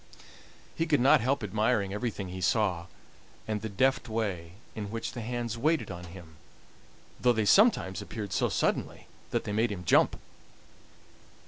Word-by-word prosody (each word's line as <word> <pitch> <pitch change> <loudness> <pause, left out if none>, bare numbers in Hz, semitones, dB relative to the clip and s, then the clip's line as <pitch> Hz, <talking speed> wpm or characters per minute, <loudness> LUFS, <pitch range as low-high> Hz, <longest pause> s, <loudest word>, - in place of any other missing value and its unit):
He 165 - -1
could 150 -2 +3
not 130 0 +5
help 130 +1 0
admiring 105 -1 0
everything 105 -3 -3
he 95 +1 -6
saw, 90 -3 +1 0.6
and 105 -1 -2
the 110 - -4
deft 130 +4 +1
way 95 -7 -3 0.2
in 105 -2 -5
which 115 +1 -4
the 120 - -6
hands 120 0 -3
waited 155 -3 +1
on 90 0 -7
him, 85 -2 -12 0.8
though 125 -1 +4
they 110 -2 0
sometimes 105 - +4
appeared 105 -4 -6
so - - +1
suddenly - - -1 0.2
that - - -1
they - - -4
made 110 +2 +1
him 90 -3 -6
jump. - - +3
110 Hz, 155 wpm, -29 LUFS, 95-120 Hz, 0.8 s, not